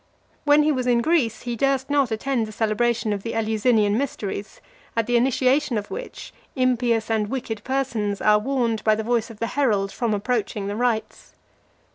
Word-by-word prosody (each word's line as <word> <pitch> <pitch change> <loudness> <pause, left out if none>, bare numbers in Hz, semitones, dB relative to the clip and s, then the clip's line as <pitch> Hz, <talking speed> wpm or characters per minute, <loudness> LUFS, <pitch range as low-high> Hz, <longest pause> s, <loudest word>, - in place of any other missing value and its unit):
When 295 +1 +5
he 305 - +3
was 255 -3 -1
in 240 -1 +3
Greece, 270 -9 +1
he 240 -1 -3
durst 270 +2 +1
not 280 -4 +3
attend 230 +1 -1
the - - -8
celebration 220 0 0
of 200 - -4
the 230 - -5
Eleusinian 220 -1 +2
mysteries, 205 -7 -4 0.4
at 230 - +2
the 245 - 0
initiation 255 +1 +2
of 205 -1 -5
which, - - -7 0.2
impious 245 -3 +1
and 215 -2 +1
wicked 225 -4 -4
persons 235 -7 -1
are 210 0 +4
warned 235 -2 -1
by 215 -1 +4
the 220 - -3
voice 235 0 0
of 225 - -11
the 230 - -2
herald 210 -8 +1
from 230 -3 -1
approaching 210 -2 -2
the 200 +1 -3
rites. 230 -2 -2
235 Hz, 180 wpm, -23 LUFS, 215-255 Hz, 0.4 s, When